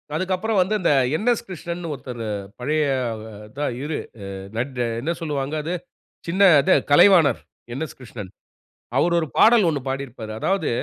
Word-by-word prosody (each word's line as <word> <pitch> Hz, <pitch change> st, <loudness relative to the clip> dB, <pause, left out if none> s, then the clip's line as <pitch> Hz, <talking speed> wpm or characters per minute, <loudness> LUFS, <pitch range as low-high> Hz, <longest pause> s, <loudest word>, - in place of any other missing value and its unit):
அதுக்கப்புறம் 185 Hz, +4 st, 0 dB
வந்து 205 Hz, +4 st, +1 dB
இந்த 170 Hz, -, +3 dB, 0.2 s
என்எஸ். 235 Hz, +5 st, 0 dB
கிருஷ்ணன்னு 170 Hz, -2 st, -5 dB
ஒருத்தரு 125 Hz, -4 st, -6 dB, 0.3 s
பழைய 150 Hz, +4 st, 0 dB, 0.3 s
அ -, -, -5 dB, 0.3 s
அத்தா 145 Hz, +6 st, -4 dB, 0.2 s
இரு 150 Hz, 0 st, -3 dB, 1.0 s
என்ன 165 Hz, +5 st, -1 dB
சொல்வாங்க? 145 Hz, -1 st, -2 dB
அது 170 Hz, +3 st, -3 dB, 0.5 s
சின்ன 185 Hz, +4 st, -1 dB, 0.2 s
அது -, -, +3 dB, 0.2 s
கலைவாணர் 165 Hz, -1 st, +6 dB, 0.3 s
என்எஸ். 155 Hz, +4 st, -5 dB
கிருஷ்ணன். 105 Hz, -6 st, -9 dB, 0.7 s
அவர் 170 Hz, 0 st, +3 dB
ஒரு 160 Hz, -, -2 dB
பாடல் 225 Hz, -3 st, +6 dB
ஒண்ணு 145 Hz, -4 st, -2 dB
பாடியிருப்பாரு. 125 Hz, -5 st, -5 dB
அதாவது 190 Hz, 0 st, 0 dB
155 Hz, 135 wpm, -22 LUFS, 135-185 Hz, 1.0 s, கலைவாணர்